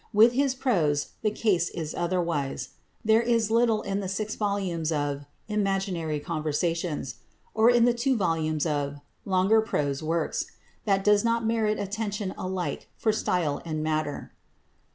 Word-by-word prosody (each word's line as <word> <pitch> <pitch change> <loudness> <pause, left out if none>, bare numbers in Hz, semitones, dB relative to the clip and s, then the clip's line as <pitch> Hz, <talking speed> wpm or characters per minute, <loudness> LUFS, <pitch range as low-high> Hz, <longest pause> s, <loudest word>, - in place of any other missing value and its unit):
With 220 +3 +7
his 270 0 +1
prose 170 - +1
the 215 - +2
case 195 -6 +1
is 160 -2 -5
otherwise. 170 -7 -1 0.4
There 220 +1 +5
is 230 -2 +1
little 230 -2 +3
in 195 0 -2
the 195 - -3
six 210 +3 -2
volumes 190 -6 -1
of 145 -2 -1 0.2
"Imaginary 195 -7 -1
Conversations," 155 -1 -2 0.4
or 220 +1 +5
in 240 -1 +5
the 245 - +4
two 250 +2 +1
volumes 160 -5 0
of 145 -2 -1 0.3
"Longer 195 +3 +4
Prose 145 -10 -1
Works," 160 +1 -1 0.4
that 195 -2 +2
does 210 0 +4
not 230 0 +1
merit 220 -1 +1
attention 205 -1 -3
alike 185 -5 -4
for 220 - +2
style 165 -8 0
and 155 -2 -3
matter. 155 -2 -2
190 Hz, 145 wpm, -27 LUFS, 155-220 Hz, 0.4 s, With